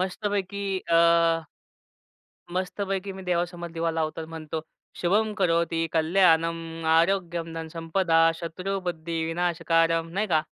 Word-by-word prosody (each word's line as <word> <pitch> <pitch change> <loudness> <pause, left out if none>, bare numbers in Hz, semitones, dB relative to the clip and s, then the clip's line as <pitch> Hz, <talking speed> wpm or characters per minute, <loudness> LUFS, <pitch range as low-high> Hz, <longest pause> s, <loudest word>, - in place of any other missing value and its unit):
मस्तपैकी 200 +1 -2 0.3
अ, - - +7 1.6
मस्तपैकी 195 +1 -2
मी - - -7
देवासमोर 175 0 -1
दिवा 165 0 0
लावतो 155 0 -2
आणि 160 - -9
म्हणतो, 160 0 -5 0.4
शुभं 210 +5 +2
करोति 170 -2 +2 0.2
कल्याणम 165 0 +3 0.4
आरोग्यम 170 -2 +1
धन 160 0 -6
संपदा 165 0 +2 0.2
शत्रु 185 +4 -3
बुद्धि 165 -1 -3
विनाशकारम. 165 -1 +1
नाही 215 - +1
का. 155 - +3
170 Hz, 115 wpm, -26 LUFS, 165-190 Hz, 1.6 s, अ